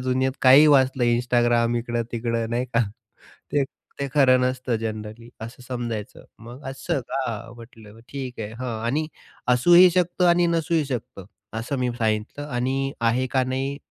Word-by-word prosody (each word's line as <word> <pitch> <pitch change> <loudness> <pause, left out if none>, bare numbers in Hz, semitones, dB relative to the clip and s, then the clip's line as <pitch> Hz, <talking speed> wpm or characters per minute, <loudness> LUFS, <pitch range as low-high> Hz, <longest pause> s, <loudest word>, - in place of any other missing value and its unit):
दुनियेत 130 +1 0
काहीही 135 +4 +8
वाचलं 130 -3 +4
Instagram 120 0 +2
इकडं-तिकडं 115 -1 -3
नाही 120 +2 0
का 115 - +4 0.7
ते 145 -1 +3 0.4
ते 140 - -1
खरं 130 -3 +5
नसतं 125 -1 -1
जनरली, 110 +1 -6
असं 115 +3 -9
समजायचं 120 -4 -5
मग. 120 +5 -11
असं 135 +3 -3
का? 115 -6 -4
म्हटलं 115 -2 -14
ठीक 130 -4 -6
आहे. 105 0 -5
हं, 115 -1 -5
आणि 145 +7 0 0.5
असूही 175 +8 +7
शकतं 180 0 +1
आणि 175 0 +4
नसूही 165 -1 +1
शकतं, 115 -7 -6 0.3
असं 130 +5 -3
मी 125 -1 0
सांगितलं. 110 +6 -2
आणि 135 +1 -1
आहे 120 +3 +1
का 130 -1 +2
नाही, 135 +2 -2
125 Hz, 145 wpm, -24 LUFS, 115-135 Hz, 0.7 s, काहीही